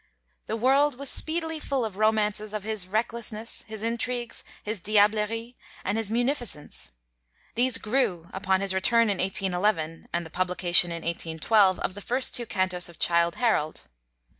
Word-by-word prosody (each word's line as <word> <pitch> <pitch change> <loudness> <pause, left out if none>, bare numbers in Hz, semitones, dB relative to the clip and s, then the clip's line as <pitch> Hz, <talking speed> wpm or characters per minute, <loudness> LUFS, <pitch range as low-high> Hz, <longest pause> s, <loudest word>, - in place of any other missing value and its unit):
The 220 - -2
world 270 +4 +3
was 275 +1 0
speedily 320 0 +1
full 275 -5 -2
of 210 -4 -6
romances 215 -1 0
of 210 - -4
his 215 -3 -1
recklessness, 225 +1 -2
his 220 -1 -6
intrigues, 235 +1 -2 0.2
his 210 -2 -3
diablerie, 215 +4 +1 0.3
and 200 - -1
his 225 -2 -1
munificence. 235 - -2 0.6
These 245 0 +5
grew, 215 -8 -1
upon 190 0 0
his 195 -1 +1
return 230 +4 +2
in 195 - -3
1811 185 -3 0
and 170 0 -2
the 160 - -12
publication 180 -1 +4
in 170 -1 -6
1812 170 +4 +1
of - - -2
the 205 - -9
first 250 +5 0
two 240 -1 -1
cantos 185 -3 +1
of 170 - -15
'Childe 170 0 +2
Harold.' 185 -11 0
210 Hz, 155 wpm, -26 LUFS, 185-235 Hz, 0.6 s, These